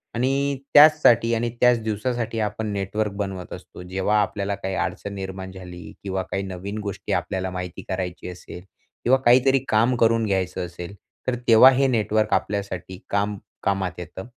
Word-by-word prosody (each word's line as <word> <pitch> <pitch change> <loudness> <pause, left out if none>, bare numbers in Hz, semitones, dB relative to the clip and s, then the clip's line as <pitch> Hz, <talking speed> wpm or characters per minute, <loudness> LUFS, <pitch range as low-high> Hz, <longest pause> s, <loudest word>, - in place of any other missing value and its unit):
आणि 135 +3 0 0.2
त्याचसाठी 145 -6 +6
आणि 120 +1 -1
त्याच 125 -2 +5
दिवसासाठी 115 +1 -2
आपण 105 +1 -2
नेटवर्क 100 +2 -2
बनवत 95 -2 -5
असतो. - - -11
जेव्हा 95 +4 +1
आपल्याला 100 0 -2
काही 95 -1 -4
अडचण 100 +1 -3
निर्माण 95 -1 -6
झाली 90 -2 -10
किंवा 95 -1 -2
काही 95 - -1
नवीन 95 +2 -6
गोष्टी 100 -2 -4
आपल्याला 95 0 -2
माहिती 90 -1 -6
करायची 90 -1 -4
असेल 90 0 -10 0.4
किंवा 130 +2 +4
काहीतरी 130 +3 +5
काम 115 +4 +3
करून 115 -1 +3
घ्यायचं 95 -3 -1
असेल. 90 +3 -9 0.3
तर 130 - +1
तेव्हा 115 +3 +8
हे 135 +1 +2
नेटवर्क 110 -3 +1
आपल्यासाठी 100 -2 -2
काम 100 0 0 0.3
कामात 95 -2 0
येतं 90 +2 -8
100 Hz, 155 wpm, -23 LUFS, 95-115 Hz, 0.4 s, तेव्हा